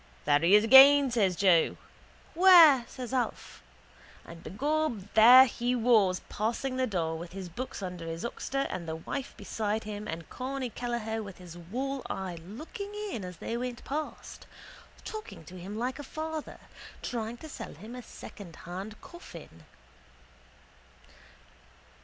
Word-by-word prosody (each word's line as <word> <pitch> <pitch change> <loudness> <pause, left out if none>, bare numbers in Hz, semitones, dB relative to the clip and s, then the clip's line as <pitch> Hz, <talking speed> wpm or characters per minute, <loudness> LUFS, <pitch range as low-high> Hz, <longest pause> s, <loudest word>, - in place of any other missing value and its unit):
— - - -28
There 145 - +4
he 170 +6 +5
is 210 - +5
again, 270 +3 +8
says 200 -6 +1
Joe. 175 -3 +3 0.6
—Where? 335 -7 +8
says 255 0 -8
Alf. 255 -2 -3 0.6
And 165 0 -12
begob 275 -3 -2
there 245 +4 +9
he 245 0 -2
was 220 -6 +3
passing 235 +5 -2
the 255 0 0
door 165 -5 -2
with 170 +1 -9
his 190 -2 -7
books 220 +3 -6
under 180 -3 -6
his 165 0 -5
oxter 275 +3 -3
and 170 -2 -5
the 160 - -3
wife 250 +11 -6
beside 215 0 -3
him 210 0 -6
and 165 -3 -6
Corny 260 -1 -5
Kelleher 230 -2 -3
with 200 -3 -9
his 175 -2 -12
wall 255 +11 -4
eye 185 -3 -5
looking 330 - -8 0.2
in 215 - -5
as 180 -2 -8
they 230 - -4
went 245 0 -5
past, 305 +3 -6 0.6
talking 430 - -8
to 185 +3 -11
him 195 +4 -7
like 255 +4 -3
a - - -6
father, 315 +2 -6 0.5
trying 230 -1 -4
to 315 - -10
sell 300 - -8
him 215 +10 -11
a 250 - -7
secondhand 195 0 -10
coffin. 165 - -13
225 Hz, 150 wpm, -29 LUFS, 185-265 Hz, 0.6 s, there